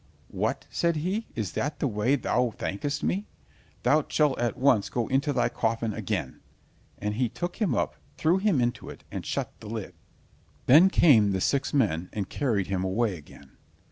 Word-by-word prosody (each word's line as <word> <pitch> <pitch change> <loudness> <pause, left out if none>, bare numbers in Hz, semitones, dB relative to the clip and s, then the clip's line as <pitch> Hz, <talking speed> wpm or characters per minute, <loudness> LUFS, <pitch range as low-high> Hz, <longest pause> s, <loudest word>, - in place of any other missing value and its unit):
"What!" - - -2
said 170 -1 +1
he, 185 +9 -2
"is 105 -6 -2
that 145 +3 -2
the 145 - 0
way 115 +4 +1
thou 125 -2 +1
thankest 140 +9 -3
me? 200 +3 -1 0.6
Thou 155 0 +4
shalt 150 -3 +2
at 120 -1 -1
once 120 -7 +3
go 120 -2 -1
into 140 +3 +1
thy 120 -3 +2
coffin 115 -1 -1
again," - - -3 0.6
and 105 +1 -2
he 120 +2 0
took 175 +8 -5
him 210 -7 +1
up, - - -1 0.2
threw 170 +4 +2
him 195 -8 +2
into 120 0 -1
it, - - -11
and - - -5
shut - - -3
the 105 - -9
lid. 110 -3 -5 0.7
Then 160 +9 +7
came 120 - +5
the 95 - 0
six 140 +8 0
men 95 - +1
and 100 -3 -3
carried 115 -9 0
him 95 0 -2
away 100 +2 0
again. 75 -4 -15
125 Hz, 180 wpm, -27 LUFS, 105-150 Hz, 0.7 s, Then